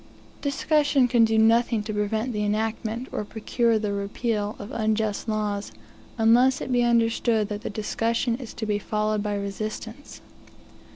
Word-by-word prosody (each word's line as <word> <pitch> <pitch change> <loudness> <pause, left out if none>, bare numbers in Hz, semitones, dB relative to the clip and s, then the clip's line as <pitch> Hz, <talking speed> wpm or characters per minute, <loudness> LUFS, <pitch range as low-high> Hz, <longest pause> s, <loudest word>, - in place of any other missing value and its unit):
Discussion 285 -2 +2
can 235 -1 +4
do 220 0 +1
nothing 225 0 +3
to 215 0 -4
prevent 215 +4 -1
the 210 -1 -1
enactment, 220 +3 -2
or - - -2
procure 230 +2 0
the 210 -1 -2
repeal, 205 +1 -2
of 205 - -8
unjust 220 0 -1
laws, 210 - -2 0.5
unless 240 +4 +4
it - - -5
be 245 -1 +3
understood 230 -2 +2
that, 210 0 -4
the - - -4
discussion 230 +3 -1
is 245 -4 -9
to 220 - -4
be 210 -1 0
followed 215 +1 -1
by 205 0 -2
resistance. 215 +5 -6
220 Hz, 155 wpm, -25 LUFS, 210-235 Hz, 0.5 s, can